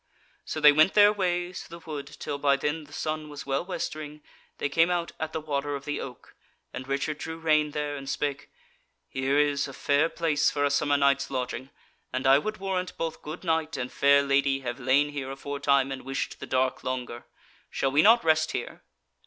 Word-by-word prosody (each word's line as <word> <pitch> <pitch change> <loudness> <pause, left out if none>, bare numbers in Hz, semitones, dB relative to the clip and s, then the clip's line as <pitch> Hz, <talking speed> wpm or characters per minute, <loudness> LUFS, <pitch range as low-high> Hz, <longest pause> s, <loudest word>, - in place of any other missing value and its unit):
So 155 - -4
they 150 -1 +8
went 155 +5 +4
their 205 0 +7
ways 180 -2 -1
through 170 +1 -10
the - - -22
wood 145 -3 -5
till 140 0 -6
by 140 -1 +4
then 150 +3 -2
the 145 - -19
sun 155 0 -3
was 145 -1 -8
well 135 +2 0
westering 155 -4 -5 0.3
they - - -1
came 165 +4 +3
out 175 -1 -1
at 160 0 -3
the 160 - -3
Water 145 -1 -2
of 140 0 -7
the 145 -1 -3
Oak, 125 -2 -10 0.4
and 130 - -6
Richard 140 +2 -2
drew 160 +1 -5
rein 155 -2 +2
there, 150 -1 -3
and 135 -1 -7
spake: 140 -1 -3 0.6
"Here 135 +2 0
is 145 -1 +2
a 135 - -9
fair 145 +5 +2
place 155 -4 +1
for 145 -1 0
a 140 - +1
summer 145 0 +2
night's 140 -1 +2
lodging, 130 0 -4 0.4
and 130 +1 -3
I 135 +1 +7
would 215 +7 -4
warrant 185 -2 -3
both 165 -1 -3
good 155 +5 -7
knight 160 -2 0
and 125 -1 -4
fair 140 0 +4
lady 140 0 +2
have 120 0 -4
lain 135 +3 +3
here 140 -2 -5
aforetime, 140 0 0
and 135 - -5
wished 135 +1 -4
the - - -7
dark 130 0 0
longer: 125 -2 -4 0.4
shall 135 - -1
we 145 +3 +5
not 230 +5 +6
rest 155 -1 +2
here?" - - -5
145 Hz, 205 wpm, -27 LUFS, 135-160 Hz, 0.6 s, they